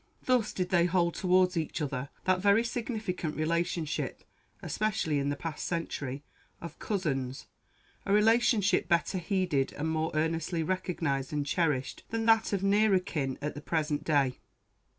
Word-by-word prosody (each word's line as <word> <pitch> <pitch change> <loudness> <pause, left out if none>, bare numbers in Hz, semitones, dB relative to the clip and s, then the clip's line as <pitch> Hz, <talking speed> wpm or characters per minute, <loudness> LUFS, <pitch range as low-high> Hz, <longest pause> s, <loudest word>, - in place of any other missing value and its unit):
Thus 250 -4 +2
did 180 -1 -2
they 175 -2 +4
hold 175 -1 +2
towards 185 0 +3
each 160 0 -2
other 140 -2 -3
that 185 0 +2
very 200 +3 +4
significant 220 -9 -3
relationship 170 0 -1 0.4
especially 210 -9 0
in 140 0 0
the 145 - -1
past 155 +2 -5
century 145 -5 -3 0.4
of 170 - -9
"cousins" 135 - -2 0.6
a - - 0
relationship 210 -1 +3
better 170 +2 +1
heeded 175 -7 0
and 155 +2 -3
more 160 0 0
earnestly 165 +2 0
recognized 160 -6 -2
and 145 -1 -1
cherished 145 -4 -1
than 225 0 -2
that 225 -1 +4
of 195 -2 -1
nearer 200 0 +4
kin 150 -8 -2
at 150 - -2
the 145 - -8
present 150 -2 -1
day. 140 -5 +1
170 Hz, 150 wpm, -30 LUFS, 150-195 Hz, 0.6 s, they